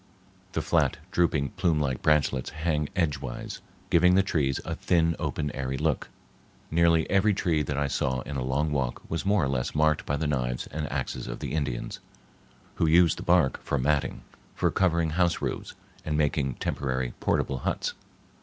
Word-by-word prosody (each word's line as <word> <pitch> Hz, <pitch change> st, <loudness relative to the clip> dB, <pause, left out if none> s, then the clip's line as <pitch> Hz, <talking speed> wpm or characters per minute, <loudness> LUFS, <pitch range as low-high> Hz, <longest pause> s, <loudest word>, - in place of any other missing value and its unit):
The -, -, -1 dB
flat, -, -, +2 dB
drooping, 75 Hz, -5 st, +2 dB
plume 85 Hz, -5 st, +2 dB
like 65 Hz, -4 st, -1 dB
branchlets 70 Hz, -4 st, +2 dB
hang 75 Hz, -1 st, -1 dB
edgewise, 75 Hz, -8 st, -2 dB, 0.3 s
giving 90 Hz, +2 st, +5 dB
the 95 Hz, -, +5 dB
trees 70 Hz, -8 st, 0 dB
a -, -, -3 dB
thin, 85 Hz, -2 st, +2 dB
open, 75 Hz, -1 st, -2 dB
airy 65 Hz, -1 st, -3 dB
look. -, -, -1 dB, 0.6 s
Nearly 85 Hz, 0 st, +4 dB
every 100 Hz, +1 st, +3 dB
tree 85 Hz, -5 st, +1 dB
that 75 Hz, 0 st, -2 dB
I 70 Hz, -, +1 dB
saw 65 Hz, -2 st, -1 dB
in 75 Hz, -, -6 dB
a 65 Hz, -, -1 dB
long 70 Hz, +4 st, 0 dB
walk 65 Hz, -4 st, -1 dB
was 80 Hz, +3 st, -3 dB
more 100 Hz, -4 st, +3 dB
or -, -, +1 dB
less 65 Hz, 0 st, -2 dB
marked 75 Hz, 0 st, +2 dB
by 70 Hz, -, 0 dB
the 80 Hz, -, -2 dB
knives 60 Hz, -4 st, -1 dB
and 75 Hz, -1 st, -4 dB
axes 60 Hz, -, -3 dB
of -, -, -4 dB
the -, -, -5 dB
Indians, 70 Hz, -6 st, -2 dB, 0.8 s
who 80 Hz, -, +2 dB
use 85 Hz, 0 st, +5 dB
the -, -, -8 dB
bark 85 Hz, -6 st, +3 dB
for 70 Hz, -, -1 dB
matting, 70 Hz, +2 st, 0 dB, 0.3 s
for -, -, +1 dB
covering 85 Hz, -3 st, +2 dB
house 85 Hz, +1 st, +2 dB
roofs, -, -, -4 dB, 0.3 s
and 75 Hz, -1 st, -1 dB
making 75 Hz, -3 st, +1 dB
temporary 65 Hz, -2 st, -2 dB
portable 65 Hz, -, 0 dB
huts. -, -, -2 dB
75 Hz, 175 wpm, -27 LUFS, 65-85 Hz, 0.8 s, giving